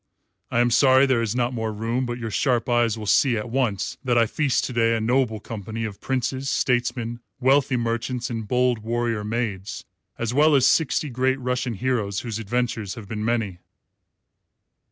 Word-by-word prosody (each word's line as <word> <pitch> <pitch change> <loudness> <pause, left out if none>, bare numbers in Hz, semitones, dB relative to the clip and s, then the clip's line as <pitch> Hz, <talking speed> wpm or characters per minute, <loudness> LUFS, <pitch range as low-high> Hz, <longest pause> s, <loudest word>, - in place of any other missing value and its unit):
I 120 - +2
am 120 0 +2
sorry 130 +2 +5
there 130 -4 +2
is 115 0 -2
not 125 0 0
more 110 -2 -2
room, 115 +4 -2
but 120 0 -3
your 115 -2 -5
sharp 120 +2 +1
eyes 120 -2 +2
will 110 - -6
see 120 +3 +3
at 105 +2 -5
once 120 -7 -1
that 125 -2 +1
I 115 - +5
feast 140 +3 0
to - - -5
day 115 -1 +2
a - - 0
noble 115 -1 +1
company 110 +1 -6
of 105 -3 -7
princes, 130 +1 -2
statesmen, 120 -2 0 0.2
wealthy 135 0 +3
merchants, 120 +1 -2
and 110 -2 -4
bold 125 0 +2
warrior 115 -1 -1
maids 105 -3 -3 0.3
as 115 0 -2
well 150 +2 +5
as 135 - +4
sixty 150 -2 +1
great 130 +2 +1
Russian 125 -1 -2
heroes 105 -4 -1
whose 115 -3 -4
adventures 115 -2 -2
have 110 -4 -9
been 105 +1 -4
many." 110 -6 -1
120 Hz, 180 wpm, -24 LUFS, 110-125 Hz, 0.3 s, sorry